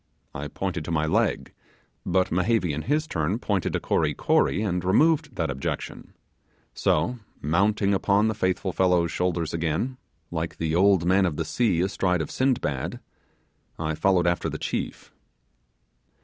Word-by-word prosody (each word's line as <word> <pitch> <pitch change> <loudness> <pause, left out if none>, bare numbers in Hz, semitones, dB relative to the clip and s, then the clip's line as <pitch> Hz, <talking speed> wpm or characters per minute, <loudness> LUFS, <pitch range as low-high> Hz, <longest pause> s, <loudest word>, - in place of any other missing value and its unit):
I 70 +1 -5
pointed 90 -1 -3
to 85 - -4
my 80 -1 +1
leg; 80 - 0 0.5
but 95 +1 +1
Mehevi 90 -1 +1
in 75 - -3
his 150 - 0
turn 85 - -1
pointed 100 -7 -1
to - - 0
Kory - - 0
Kory, 100 - +2
and 90 -4 -1
removed 150 - +2
that - - -1
objection; 65 - -5 0.6
so, 100 +11 0 0.2
mounting 100 +6 +1
upon 100 +2 +2
the 110 - 0
faithful 95 -2 -1
fellow's 90 -3 +2
shoulders 85 -2 -1
again 85 +11 -1 0.3
like 80 0 -3
the 80 -1 -1
old 95 0 +4
man 95 +1 +4
of 80 - -3
the 80 - -2
sea 95 -2 +1
astride 90 -2 0
of - - -8
Sindbad 120 - -1 0.8
I 80 0 -2
followed 90 +2 +2
after 85 0 +1
the - - -4
chief. - - -4
90 Hz, 150 wpm, -25 LUFS, 80-100 Hz, 0.8 s, old